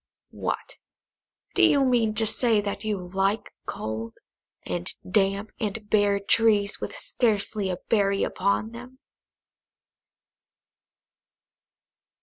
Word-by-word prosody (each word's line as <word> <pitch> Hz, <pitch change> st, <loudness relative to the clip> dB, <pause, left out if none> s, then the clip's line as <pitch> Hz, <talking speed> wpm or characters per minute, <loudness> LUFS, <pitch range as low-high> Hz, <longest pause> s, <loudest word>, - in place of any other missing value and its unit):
"What, -, -, -4 dB, 0.8 s
do 375 Hz, -, +2 dB
you 295 Hz, -6 st, +5 dB
mean 235 Hz, -4 st, +2 dB
to 220 Hz, -, +2 dB
say 220 Hz, 0 st, +3 dB
that 200 Hz, 0 st, -3 dB
you 215 Hz, -2 st, -1 dB
like 195 Hz, +3 st, 0 dB
cold, 110 Hz, +1 st, -4 dB, 0.5 s
and 90 Hz, -1 st, -2 dB, 0.2 s
damp, 195 Hz, +2 st, +1 dB
and 215 Hz, -1 st, -3 dB
bare 205 Hz, -1 st, +3 dB
trees, 205 Hz, 0 st, +2 dB
with -, -, -5 dB
scarcely 210 Hz, -3 st, 0 dB
a 180 Hz, -, -2 dB
berry 200 Hz, -3 st, +2 dB
upon 200 Hz, +3 st, 0 dB
them?" 245 Hz, +2 st, -11 dB
210 Hz, 105 wpm, -26 LUFS, 195-225 Hz, 0.8 s, you